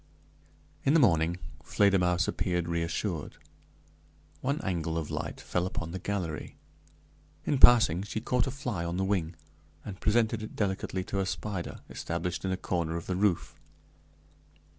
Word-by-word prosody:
In 140 Hz, -, +4 dB
the -, -, +7 dB
morning 85 Hz, -, +4 dB, 0.3 s
Fledermausse 90 Hz, -3 st, +3 dB
appeared 90 Hz, -3 st, 0 dB
reassured. 85 Hz, 0 st, -2 dB, 1.0 s
One 140 Hz, +3 st, 0 dB
angle 85 Hz, -3 st, -1 dB
of 80 Hz, -2 st, -3 dB
light -, -, -4 dB
fell 90 Hz, +1 st, -1 dB
upon 85 Hz, -3 st, -4 dB
the 95 Hz, -, -4 dB
gallery. 90 Hz, -5 st, -3 dB, 0.9 s
In 140 Hz, -, +1 dB
passing, 115 Hz, -10 st, +7 dB
she 105 Hz, +2 st, -3 dB
caught 125 Hz, +2 st, +1 dB
a -, -, 0 dB
fly 125 Hz, -9 st, -3 dB
on 85 Hz, +1 st, -2 dB
the 95 Hz, -, +1 dB
wing, 90 Hz, -4 st, 0 dB, 0.5 s
and 95 Hz, -3 st, -7 dB
presented 110 Hz, 0 st, +2 dB
it 110 Hz, -, -7 dB
delicately 95 Hz, -2 st, -1 dB
to 100 Hz, -, -3 dB
a 95 Hz, -, 0 dB
spider 95 Hz, -2 st, -4 dB
established 85 Hz, +1 st, -3 dB
in 95 Hz, -, 0 dB
a 95 Hz, -, 0 dB
corner 85 Hz, -3 st, -1 dB
of 85 Hz, -, -6 dB
the 95 Hz, -, -1 dB
roof. 95 Hz, -2 st, 0 dB
95 Hz, 150 wpm, -30 LUFS, 85-105 Hz, 1.0 s, the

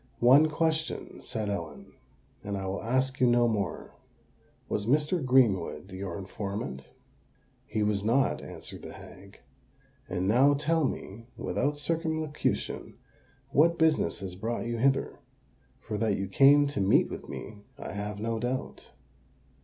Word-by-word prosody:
"One 135 Hz, +6 st, +6 dB
question," 160 Hz, 0 st, -2 dB
said 110 Hz, -1 st, -4 dB
Ellen,—"and 100 Hz, +2 st, -7 dB
I 95 Hz, -, -4 dB
will 95 Hz, +1 st, -3 dB
ask 130 Hz, +3 st, 0 dB
you 125 Hz, -, +5 dB
no 120 Hz, 0 st, +4 dB
more. 100 Hz, -7 st, -2 dB, 0.7 s
Was 105 Hz, -, -2 dB
Mr. 150 Hz, +5 st, +2 dB
Greenwood 100 Hz, -10 st, +2 dB
your 95 Hz, -2 st, -5 dB
informant?" 100 Hz, -, -5 dB, 0.8 s
"He 110 Hz, 0 st, -1 dB
was 105 Hz, -1 st, 0 dB
not," 120 Hz, +5 st, +2 dB
answered -, -, -8 dB
the -, -, -9 dB
hag. -, -, -13 dB, 0.7 s
"And 95 Hz, 0 st, -1 dB
now 135 Hz, +7 st, +5 dB
tell 155 Hz, +2 st, +1 dB
me, 115 Hz, -2 st, -5 dB
without 145 Hz, +1 st, -1 dB
circumlocution, 160 Hz, 0 st, -2 dB, 0.6 s
what 170 Hz, +4 st, +4 dB
business 160 Hz, -8 st, +2 dB
has 95 Hz, -2 st, -5 dB
brought 115 Hz, +6 st, -3 dB
you 120 Hz, 0 st, -2 dB
hither—for 135 Hz, -4 st, -3 dB
that 110 Hz, -3 st, +1 dB
you 95 Hz, -, -2 dB
came 140 Hz, +8 st, +6 dB
to 140 Hz, -6 st, -2 dB
meet 95 Hz, -, +4 dB
with -, -, -8 dB
me 105 Hz, -, -7 dB, 0.2 s
I -, -, -6 dB
have 105 Hz, +1 st, -5 dB
no 115 Hz, +1 st, -2 dB
doubt." 125 Hz, +3 st, -4 dB
115 Hz, 135 wpm, -29 LUFS, 100-145 Hz, 0.8 s, One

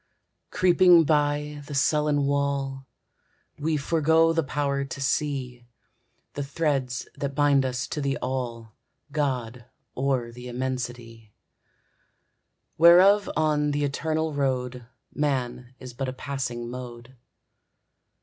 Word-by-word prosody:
Creeping 180 Hz, -2 st, +5 dB
by 150 Hz, 0 st, 0 dB
the 145 Hz, -, -6 dB
sullen 150 Hz, 0 st, +2 dB
wall, 140 Hz, -1 st, -1 dB, 0.7 s
We 155 Hz, +1 st, 0 dB
forego 160 Hz, +2 st, +3 dB
the 165 Hz, -, +2 dB
power 140 Hz, -1 st, -1 dB
to 135 Hz, +1 st, -7 dB
see, 135 Hz, -3 st, -2 dB, 0.7 s
The 145 Hz, -, -4 dB
threads 140 Hz, -3 st, -2 dB
that 140 Hz, -1 st, -4 dB
bind 145 Hz, -2 st, +3 dB
us 125 Hz, -1 st, -2 dB
to 150 Hz, -, -3 dB
the 140 Hz, 0 st, -1 dB
All, 120 Hz, -4 st, -4 dB, 0.4 s
God 125 Hz, -5 st, -2 dB, 0.3 s
or 130 Hz, -3 st, -1 dB
the 125 Hz, +1 st, -10 dB
Immensity; 120 Hz, -3 st, -5 dB, 1.4 s
Whereof 185 Hz, +5 st, +7 dB
on 150 Hz, -1 st, +1 dB
the 145 Hz, 0 st, -1 dB
eternal 155 Hz, +2 st, -1 dB
road 125 Hz, -3 st, -2 dB, 0.3 s
Man 130 Hz, -4 st, -2 dB
is 125 Hz, -1 st, -10 dB
but 130 Hz, +1 st, -3 dB
a -, -, -5 dB
passing 125 Hz, -3 st, -4 dB
mode. 120 Hz, 0 st, -9 dB
140 Hz, 110 wpm, -25 LUFS, 125-150 Hz, 1.4 s, Whereof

